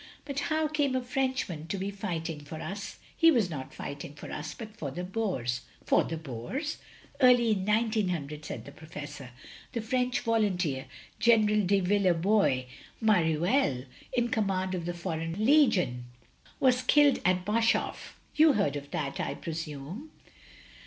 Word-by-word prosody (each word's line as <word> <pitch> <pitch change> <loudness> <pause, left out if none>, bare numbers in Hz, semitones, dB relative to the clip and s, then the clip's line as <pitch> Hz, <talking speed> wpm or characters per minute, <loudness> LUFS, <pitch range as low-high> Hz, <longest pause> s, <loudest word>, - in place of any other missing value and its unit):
But 280 -1 -3
how 310 0 +2
came 290 -3 0
a 255 - +1
Frenchman 250 - -2
to 195 - -2
be 195 +1 -3
fighting 170 -6 -4
for 150 +2 -8
us?" 195 +6 -6
" - - -27
He 330 - +6
was 230 - +3
not 135 -4 -6
fighting 140 0 -7
for 150 - -9
us, 150 0 -5
but 220 -2 -9
for 145 - -4
the 175 +7 -5
Boers. 180 - -2
" - - -28
"For - - +4
the 165 - -4
Boers!" 160 - -4 0.4
"Early 245 -3 +6
in 195 -2 0
1900," 190 -10 0
said - - -6
the - - -9
Professor, 150 -4 -9 0.4
"the 235 - -1
French 250 +3 0
voltmteer. 185 - +1 0.3
General 215 -4 +4
de 200 +1 +3
Villebois 180 -6 +3 0.4
Mareuir 175 - +2 0.3
in 240 -1 +1
command 190 -4 0
of 175 -2 -3
the 175 0 -3
foreign 170 +3 -3
legion, 195 - +4 0.5
was 255 -1 +4
killed 290 +2 +5
at 180 0 +2
Boshof. 225 +3 0 0.2
You 310 -1 +6
heard 200 - +1
of 145 0 -6
that, 140 -3 -3
I - - -2
presume?" 160 - -6
190 Hz, 155 wpm, -29 LUFS, 155-235 Hz, 0.5 s, He